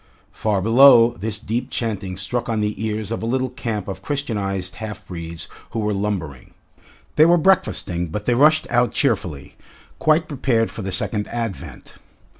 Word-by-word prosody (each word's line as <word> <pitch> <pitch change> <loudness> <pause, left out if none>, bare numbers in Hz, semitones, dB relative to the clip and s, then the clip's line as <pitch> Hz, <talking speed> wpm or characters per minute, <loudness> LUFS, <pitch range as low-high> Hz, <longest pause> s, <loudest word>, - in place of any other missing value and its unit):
Far 105 -4 -1
below, 120 +1 +7
this 110 0 -5
deep 115 +3 -3
chanting 100 -5 -3
struck 120 +5 -2
on 110 -1 0
the 105 0 -2
ears 110 -1 -3
of 115 - -3
a - - -3
little 130 +1 -1
camp 115 -7 -4
of 95 - -6
Christianised 100 -10 -3
half 110 -2 -7
breeds 85 -2 -7 0.2
who 115 - -4
were 105 -1 0
lumbering. 95 -10 -4 0.6
They 155 - +7
were 175 +1 +5
breakfasting, 100 - +1
but 105 +6 -5
they 125 - +2
rushed 155 +5 +4
out 120 0 +2
cheerfully, 95 - -1 0.4
quite 155 +1 +3
prepared 125 -5 0
for - - -7
the 95 -1 -4
Second 105 +3 0
Advent. 115 -4 -6
110 Hz, 165 wpm, -21 LUFS, 95-120 Hz, 0.6 s, below